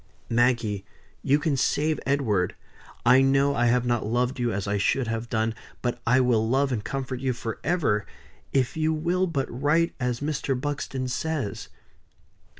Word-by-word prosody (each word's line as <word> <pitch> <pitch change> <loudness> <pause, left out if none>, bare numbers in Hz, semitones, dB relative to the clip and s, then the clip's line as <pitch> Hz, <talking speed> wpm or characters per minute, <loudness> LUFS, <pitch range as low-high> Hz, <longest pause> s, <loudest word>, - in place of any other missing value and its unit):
"Maggie, 115 -4 +2 0.4
you 140 +1 +3
can 150 -1 0
save 150 +3 +1
Edward. 110 -10 +1 0.5
I 125 +2 +7
know 135 +1 +3
I 120 -3 +2
have 125 +1 +2
not 120 -1 +1
loved 125 +4 0
you 120 -1 +1
as 100 0 -3
I 100 0 0
should 130 +6 +1
have 115 +1 -3
done; 110 0 0 0.3
but 120 -1 -2
I 125 +2 +5
will 115 -3 +2
love 135 +2 +2
and 110 -4 -2
comfort 130 +2 -4
you 130 -1 0
forever, 115 0 -1 0.4
if 130 -2 +1
you 160 0 +1
will 175 +4 +1
but 140 -6 -1
write 150 +7 +1
as 125 -2 -1
Mr. 140 -3 -1
Buxton 135 -2 -3
says. 135 -5 -3
130 Hz, 160 wpm, -26 LUFS, 115-140 Hz, 0.5 s, I